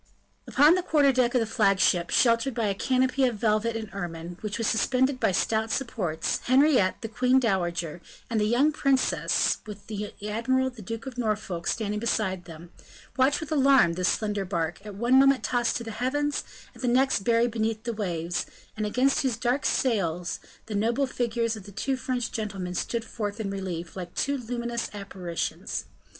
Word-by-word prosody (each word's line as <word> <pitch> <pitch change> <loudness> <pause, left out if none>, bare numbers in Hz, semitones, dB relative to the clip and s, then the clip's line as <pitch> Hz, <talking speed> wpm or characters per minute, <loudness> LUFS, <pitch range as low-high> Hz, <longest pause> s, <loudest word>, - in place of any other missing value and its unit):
Upon 295 +4 +6
the 365 - +2
quarter 295 -5 +3
deck 250 -1 +1
of - - +5
the - - +1
flagship, 195 -5 +2
sheltered 235 +1 +3
by 230 - 0
a 200 - +1
canopy 260 +5 +1
of 245 -3 0
velvet 215 +2 +1
and 225 -1 -4
ermine, 175 -2 -5
which 210 -1 -3
was 230 - -1
suspended 255 +4 +1
by - - +2
stout 220 +4 0
supports, 210 - -1
Henriette, 260 -6 +4
the - - -2
queen 250 +3 +3
dowager, 175 -7 -1 0.3
and 225 -2 0
the - - +2
young 260 +7 +3
princess 275 -3 +1
with 210 -1 -9
the 210 -1 -5 0.2
admiral, 260 +5 0
the 240 -3 -12
Duke 225 +3 -6
of 255 -2 -7
Norfolk, 210 -6 -2
standing 210 -2 -1
beside 190 -5 -1
them 170 0 -11 0.4
watched 265 +4 +3
with 315 0 -7
alarm 270 - +5
this 180 +1 +1
slender 210 -2 -1
bark, 175 -1 -3
at 210 -2 -8
one 240 +5 +4
moment 275 -1 +4
tossed 240 -2 +1
to 235 - -6
the 225 - -6
heavens, 290 +6 -1 0.3
and 240 - -13
the 250 - -1
next 260 +1 +3
buried 230 +3 +2
beneath 220 -1 -1
the 235 - -2
waves, 175 -5 -2 0.3
and 215 -1 -2
against 255 +5 +2
whose 255 -4 0
dark 250 +3 0
sail 180 -9 0 0.4
the 220 - -6
noble 230 +6 +1
figures 235 -3 -1
of 205 -3 -10
the 205 - -10
two 260 +7 -1
French 250 -2 -2
gentlemen 195 -5 -4
stood 230 +5 -2
forth 210 -2 -4
in 200 -3 -3
relief 180 -4 -5
like 180 -2 -7
two 280 - 0
luminous 235 -1 -3
apparitions. 185 -4 -4
225 Hz, 185 wpm, -27 LUFS, 195-255 Hz, 0.4 s, Upon